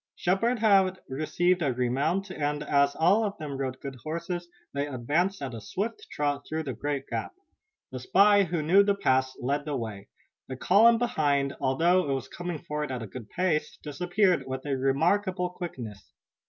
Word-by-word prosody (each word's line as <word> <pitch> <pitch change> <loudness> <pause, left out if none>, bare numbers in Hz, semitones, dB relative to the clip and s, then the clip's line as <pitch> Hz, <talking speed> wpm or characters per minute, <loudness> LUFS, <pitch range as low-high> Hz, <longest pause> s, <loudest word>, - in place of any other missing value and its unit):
Shepard 230 +8 +1
had 195 -4 +4
received 175 +6 0
a 140 -5 +1
remount, 145 +11 0
and, 150 -2 -2
as 140 -1 +2
all 190 +7 +4
of 205 -1 -3
them 150 -3 -5
rode 130 -1 -3
good 135 -2 -7
horses, 170 +6 -4 0.3
they 140 +1 -1
advanced 145 +8 -1
at 130 -3 -4
a 115 - -7
swift 230 - -4
trot 145 -1 -2
through 160 +1 -2
the 135 -4 -4
great 140 +3 -3
gap. - - -4 0.6
The 130 - -5
spy, 200 +9 +5
who 170 -2 -2
knew 180 +6 +6
the 200 0 +2
pass, 130 -9 +1
led 140 +3 -1
the 150 -2 -2
way. 105 -4 -6 0.4
The 130 - -5
column 225 - +5
behind, 145 - 0
although 165 +5 +2
it - - +1
was 130 -1 -5
coming 175 +2 -5
forward 150 -2 -3
at 125 -3 -4
a - - -5
good 110 +2 -9
pace, 155 -4 -1
disappeared 175 +1 +1
with 130 +1 -5
remarkable 170 +8 +1
quickness. 120 - -8
150 Hz, 175 wpm, -27 LUFS, 135-185 Hz, 0.6 s, knew